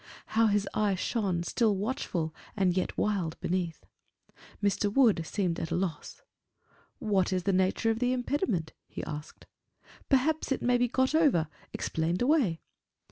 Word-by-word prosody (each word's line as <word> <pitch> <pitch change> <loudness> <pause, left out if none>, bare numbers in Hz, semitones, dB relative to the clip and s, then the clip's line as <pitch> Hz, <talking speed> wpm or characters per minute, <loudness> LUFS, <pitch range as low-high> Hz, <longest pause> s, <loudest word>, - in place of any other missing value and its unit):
How 225 +1 +5
his 205 -1 +1
eye 210 -2 +1
shone, 185 -3 -1
still, 215 +3 +1
watchful, 190 - -2 0.2
and 185 -3 +2
yet 185 - -1
wild 190 -6 -1
beneath! 175 -3 -2 0.7
Mr. 205 0 +1
Wood 220 -8 +4
seemed 180 -3 -1
at 165 - -3
a - - -1
loss. 180 - -4 0.7
"What 195 -4 +1
is 185 -1 0
the 195 - +1
nature 190 +4 +2
of 225 - -2
the 250 0 +2
impediment?" 245 - -1
he - - -7
asked. 150 0 -7 0.6
"Perhaps 290 +3 +2
it 270 - 0
may 245 0 +3
be 245 - +3
got 260 +4 +1
over 275 - +3 0.2
explained 165 +5 -1
away?" 245 - +2
200 Hz, 150 wpm, -29 LUFS, 175-245 Hz, 0.7 s, How